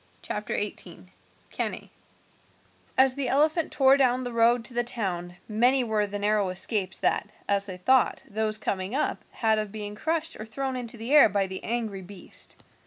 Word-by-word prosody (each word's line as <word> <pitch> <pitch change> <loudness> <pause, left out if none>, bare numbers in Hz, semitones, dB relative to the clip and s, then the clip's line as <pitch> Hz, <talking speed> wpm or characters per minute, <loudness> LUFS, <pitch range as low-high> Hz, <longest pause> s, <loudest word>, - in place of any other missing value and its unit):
CHAPTER - - -4
XVIII: - - -7 0.4
CANNAE - - -4 1.1
As 265 -1 +5
the 275 -1 -2
elephant 310 +4 +2
tore 270 0 +5
down 255 -2 +2
the 245 -1 -5
road 230 +1 +3
to 250 - -5
the 240 0 +1
town 180 -7 -3
many 245 +5 +3
were 215 -3 0
the 205 0 -4
narrow 205 -1 +1
escapes 190 +1 0
that, - - +1 0.2
as 200 0 +2
they 185 -2 -6
thought, 255 +8 +2
those 215 0 -1
coming 195 +1 -2
up 295 - -1
had 220 -2 +1
of 215 -2 -4
being 210 -1 -5
crushed 320 +7 -2
or 215 - -6
thrown 265 +4 -3
into 240 -2 -6
the 230 +5 -3
air 295 -7 +8
by 200 0 +1
the 190 0 -7
angry 220 -4 -3
beast. 190 0 -11
220 Hz, 175 wpm, -27 LUFS, 205-255 Hz, 1.1 s, air